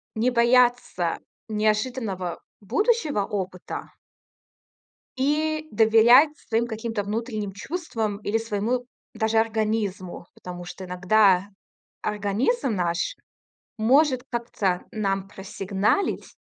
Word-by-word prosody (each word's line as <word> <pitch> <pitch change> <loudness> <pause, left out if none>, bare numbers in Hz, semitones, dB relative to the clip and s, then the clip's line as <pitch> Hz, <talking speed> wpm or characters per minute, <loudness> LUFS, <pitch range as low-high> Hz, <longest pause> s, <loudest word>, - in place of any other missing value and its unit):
не 235 +3 +2
бояться 240 -7 +3 0.3
неожиданного 215 -3 -1 0.2
будущего 300 - +1
опыта 185 -3 -5 1.3
и 310 +3 0
доверять 230 +6 +6
своим 230 +1 -1
каким-то 225 -2 -3
внутренним 215 -1 -3
чувствам 220 - -3
или 210 +1 -1
своему 225 +3 -2 0.3
даже 220 0 +1
организму, 215 -5 -1
потому 175 -1 -8
что 185 +1 -8
иногда 185 +1 +3 0.5
организм 210 - 0
наш 170 -1 -1 0.6
может 260 +3 +4
как-то 215 -6 -1
нам 195 -3 -2
просигналить 195 - -1
220 Hz, 85 wpm, -25 LUFS, 195-245 Hz, 1.3 s, доверять